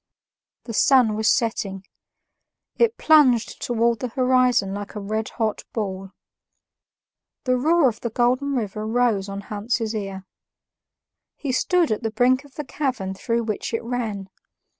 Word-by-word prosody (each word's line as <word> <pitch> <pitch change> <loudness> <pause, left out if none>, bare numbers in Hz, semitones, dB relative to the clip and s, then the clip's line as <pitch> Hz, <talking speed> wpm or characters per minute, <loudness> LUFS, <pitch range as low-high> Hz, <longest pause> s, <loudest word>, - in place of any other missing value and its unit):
The 230 - -7
sun 245 -2 +4
was 220 0 0
setting; 215 -6 -1 0.9
it 465 -1 +3
plunged 275 -7 +4
towards 235 -1 +1
the 250 - -2
horizon 250 -4 +2
like 205 +1 -6
a - - -3
redhot 215 +1 -2
ball. 195 -3 -4 1.3
The 255 -2 +2
roar 310 +4 +3
of 225 -3 -3
the 235 - -2
Golden 255 +5 +1
River 215 -2 -3
rose 225 -4 +1
on 200 0 -5
Hans's 215 +2 -2
ear. 195 -2 -5 1.1
He 280 - -3
stood 345 +4 +2
at 215 - -1
the 225 - -1
brink 250 +4 +2
of 285 -2 -19
the 300 - -5
chasm 255 -11 -3
through 230 +4 -1
which 220 +1 -3
it 230 - -3
ran. 220 -5 -4
230 Hz, 140 wpm, -23 LUFS, 210-255 Hz, 1.3 s, sun